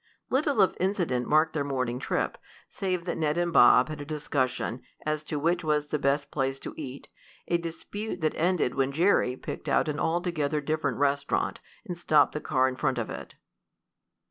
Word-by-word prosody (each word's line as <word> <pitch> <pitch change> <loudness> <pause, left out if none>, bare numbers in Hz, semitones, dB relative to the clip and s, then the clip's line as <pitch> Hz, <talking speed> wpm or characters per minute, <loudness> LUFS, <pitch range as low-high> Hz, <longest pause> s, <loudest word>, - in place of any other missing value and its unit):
Little 270 -5 +3
of 190 - +1
incident 175 - 0
marked 155 +2 +3
their 150 -2 0
morning 130 -3 -2
trip, - - -2 0.3
save 185 -3 -2
that 175 - -3
Ned 155 0 +1
and 175 -1 0
Bob 125 -1 +7
had 155 -1 -6
a - - -4
discussion 130 -5 -2 0.2
as 155 0 -1
to 150 - -3
which 170 +4 +1
was 150 -1 0
the 150 - -1
best 140 +1 0
place 135 -1 -1
to - - -6
eat, 140 -3 -7 0.4
a 170 - +2
dispute 180 +5 -5
that 155 - +1
ended 170 -7 +1
when 135 0 +1
Jerry 160 -5 +3
picked - - -6
out - - +3
an 150 -1 -2
altogether 160 -3 0
different 155 +2 -1
restaurant, 140 0 0 0.3
and 175 - -4
stopped 155 -4 +4
the 150 - -4
car 130 -3 +2
in 130 -1 -3
front 135 -3 0
of 115 - -3
it. - - -8
150 Hz, 185 wpm, -28 LUFS, 135-170 Hz, 0.4 s, Bob